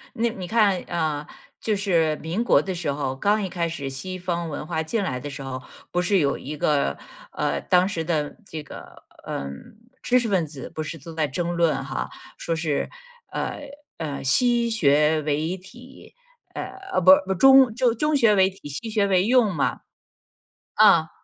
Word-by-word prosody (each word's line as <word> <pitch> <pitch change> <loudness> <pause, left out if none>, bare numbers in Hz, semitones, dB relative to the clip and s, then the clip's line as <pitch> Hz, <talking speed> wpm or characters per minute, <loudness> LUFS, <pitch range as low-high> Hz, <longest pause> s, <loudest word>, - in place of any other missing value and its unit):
那 235 +1 +1
你 185 -4 -7
看 205 -3 +3
啊， 155 -3 -2 0.3
就 215 -2 0
是 165 -6 +1
民 170 +8 -2
国 - - +4
的 190 -1 -4
时 165 -4 -2
候， 140 -2 -2
刚 205 +9 +1
一 195 - -2
开 170 -2 -2
始 140 -4 -5
西 185 +8 -6
方 170 -2 -3
文 150 +1 -6
化 160 0 -1
进 220 +6 -1
来 130 -10 -2
的 145 +3 -6
时 140 0 -8
候， 130 -1 -6 0.3
不 180 - +1
是 195 +2 +2
有 140 -2 +1
一 150 +3 -7
个， 145 -1 +1 0.3
呃， - - -1
当 180 0 +3
时 170 -5 -3
的 155 -3 -2
这 160 -4 -6
个， 145 - -12 0.2
嗯， 70 - -7 0.2
知 250 +1 +3
识 235 - -2
分 185 -5 +1
子 145 -4 -9
不 155 - -5
是 155 +2 -6
都 160 +3 -10
在 160 -1 0
争 170 +5 -2
论 170 -2 +1
哈， - - -4 0.3
说 165 - -3
是 160 -3 -1 0.4
呃 - - -3 0.4
呃 150 -4 -4
西 235 - +3
学 150 -6 +3
为 155 +4 -1
体， 245 +8 -15 0.4
呃， - - -4 0.3
啊， - - +2
不 - - +7
不， 190 - 0
中 265 +3 +6
就 245 0 +2
中 300 +6 0
学 230 -5 +4
为 190 -1 +4
体， 195 -5 -12
西 150 +11 -5
学 210 -2 +1
为 185 -2 +3
用 230 -5 +3
嘛。 145 - 0 1.0
啊。 - - +6
175 Hz, 200 characters per minute, -24 LUFS, 150-210 Hz, 1.0 s, 不